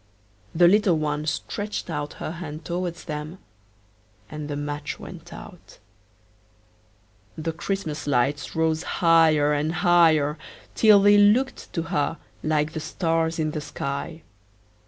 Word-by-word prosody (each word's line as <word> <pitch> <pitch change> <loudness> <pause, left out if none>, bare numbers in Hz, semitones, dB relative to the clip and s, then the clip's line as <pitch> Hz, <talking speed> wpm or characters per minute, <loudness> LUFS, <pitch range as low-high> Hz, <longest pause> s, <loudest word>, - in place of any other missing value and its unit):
The 175 +1 +6
little 195 -2 +4
one 150 0 -2
stretched 205 +6 -3
out 150 -3 -4
her - - -6
hand 160 -2 -8
towards 175 0 -4
them, 155 +2 -6 0.9
and 150 -1 -6
the 145 - -3
match 145 0 -5
went - - -11
out. - - -12 1.6
The 160 +1 -3
Christmas 160 -3 -4
lights 140 +1 0
rose 160 -1 +1
higher 160 -4 +3
and 150 +2 0
higher, 165 -4 +3 0.3
till 210 -3 +6
they 205 0 +6
looked 230 +7 +2
to 165 - -1
her 165 -1 -1 0.2
like 155 0 0
the 160 - -3
stars 165 0 -1
in 155 -1 -1
the 150 - -4
sky. 145 +3 -5
160 Hz, 130 wpm, -24 LUFS, 150-175 Hz, 1.6 s, The